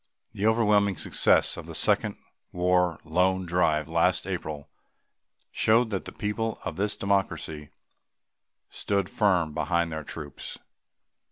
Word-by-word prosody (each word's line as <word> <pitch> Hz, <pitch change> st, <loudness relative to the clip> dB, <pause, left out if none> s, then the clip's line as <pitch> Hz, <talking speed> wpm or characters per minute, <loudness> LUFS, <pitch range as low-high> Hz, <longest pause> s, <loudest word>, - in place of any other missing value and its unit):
The 105 Hz, 0 st, 0 dB
overwhelming 105 Hz, -4 st, +3 dB
success 80 Hz, -, +3 dB
of -, -, -8 dB
the -, -, -7 dB
Second -, -, +1 dB, 0.4 s
War 90 Hz, -1 st, +1 dB
Loan 90 Hz, +3 st, +1 dB
Drive 80 Hz, -3 st, +1 dB
last 85 Hz, +2 st, +1 dB
April 80 Hz, -6 st, -5 dB, 0.8 s
showed 115 Hz, +1 st, +3 dB
that 95 Hz, -, -3 dB
the -, -, -7 dB
people 110 Hz, +1 st, -3 dB
of 80 Hz, -, -4 dB
this 105 Hz, +3 st, -1 dB
Democracy 95 Hz, -6 st, -2 dB, 1.0 s
stood 100 Hz, -2 st, -2 dB
firm 90 Hz, -7 st, +1 dB
behind 85 Hz, +2 st, 0 dB
their 80 Hz, -1 st, -4 dB
troops. 75 Hz, -2 st, -8 dB
90 Hz, 120 wpm, -27 LUFS, 80-100 Hz, 1.0 s, overwhelming